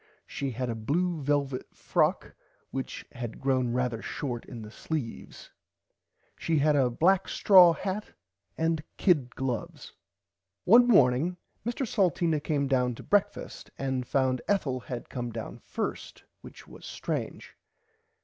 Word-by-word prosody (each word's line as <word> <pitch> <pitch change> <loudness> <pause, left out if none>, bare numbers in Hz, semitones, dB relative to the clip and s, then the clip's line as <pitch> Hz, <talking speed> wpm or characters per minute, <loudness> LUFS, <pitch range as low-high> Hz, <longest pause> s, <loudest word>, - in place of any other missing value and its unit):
She 140 - -4
had 125 +1 -3
a 120 - -1
blue 155 +9 -1
velvit 140 -2 -1
frock - - 0 0.4
which 135 -1 -5
had 120 -2 -6
grown 130 -3 +1
rarther 125 -2 -1
short 125 -5 -4
in 115 -3 -8
the 105 - -10
sleeves. 140 -3 -6 0.9
She 165 -1 0
had 150 +1 +3
a 135 -3 +3
black 180 +10 +2
straw 180 -4 +7
hat 195 +5 -4 0.4
and 160 -1 +1 0.2
kid 145 -10 +2
gloves. 130 -4 -4
[Pg - - -33 0.7
24] 180 - -2
One 245 +2 +8
morning 160 - +4 0.3
Mr 240 +3 -2
Salteena 170 -6 +1
came 145 -3 0
down 125 -2 +1
to - - -10
brekfast 205 -1 -1
and 130 -2 -2
found 130 -2 +1
Ethel 145 -11 0
had 125 -1 -7
come 120 -1 -4
down - - -7
first - - -5 0.2
which - - -13
was - - -13
strange. - - -5
140 Hz, 140 wpm, -28 LUFS, 125-170 Hz, 0.9 s, One